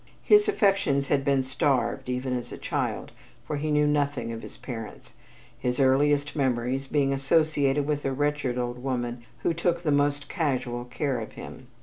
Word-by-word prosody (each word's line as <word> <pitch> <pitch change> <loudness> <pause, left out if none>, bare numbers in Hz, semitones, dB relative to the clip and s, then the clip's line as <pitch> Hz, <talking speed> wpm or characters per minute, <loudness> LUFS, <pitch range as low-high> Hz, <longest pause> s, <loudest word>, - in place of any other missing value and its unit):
His 420 0 +6
affections 195 - +2
had 140 -1 +2
been 135 -1 +2
starved, 130 -3 0
even 125 0 -1
as 120 -1 -5
a - - -6
child, - - -3 0.3
for 150 - -3
he 155 +2 -2
knew 150 0 +3
nothing 145 -4 0
of 115 0 -6
his - - -11
parents, 115 -4 -8 0.5
his 125 +1 -1
earliest 145 +2 +3
memories 130 -1 0
being 140 -1 +1
associated 140 0 +2
with 145 -1 -1
a 135 - 0
wretched 145 -2 -1
old 125 0 -3
woman 120 -2 -2 0.2
who - - +2
took 170 +1 0
the 155 - +1
most 145 0 +1
casual 125 -7 -2
care 130 +1 -2
of - - -7
him. - - -10
140 Hz, 175 wpm, -27 LUFS, 125-150 Hz, 0.5 s, His